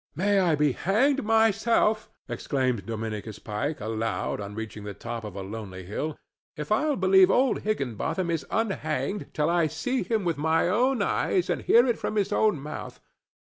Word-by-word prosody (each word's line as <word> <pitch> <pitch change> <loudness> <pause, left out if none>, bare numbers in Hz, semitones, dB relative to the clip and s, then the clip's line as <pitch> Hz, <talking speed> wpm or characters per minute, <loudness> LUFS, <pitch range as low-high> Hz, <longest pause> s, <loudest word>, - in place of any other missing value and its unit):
"May 200 +5 +2
I 175 -4 +3
be 150 -1 +2
hanged 260 - +1
myself," 220 0 +2 0.2
exclaimed 130 -7 -1
Dominicus 110 -1 -4
Pike, 130 +9 -3
aloud, 110 0 -2
on 100 0 -7
reaching 110 -1 -6
the 100 -1 -6
top 115 -1 -6
of 105 -3 -7
a 100 - -5
lonely 95 -2 -7
hill, 145 - -4 0.4
"if 150 +4 -6
I'll 295 +7 +2
believe 190 0 +5
old 255 +6 +3
Higginbotham 170 - -2
is 165 -2 -1
unhanged 200 - -2
till 150 +2 +1
I 170 -2 +3
see 255 - -2
him 220 -3 -1
with 165 -4 -1
my 160 +2 +2
own 240 +4 +2
eyes 185 -2 +1
and - - -1
hear 235 +2 +5
it 240 -3 0
from - - -3
his 205 -2 +1
own 210 -8 +2
mouth. 150 +2 -7
165 Hz, 175 wpm, -26 LUFS, -, 0.4 s, believe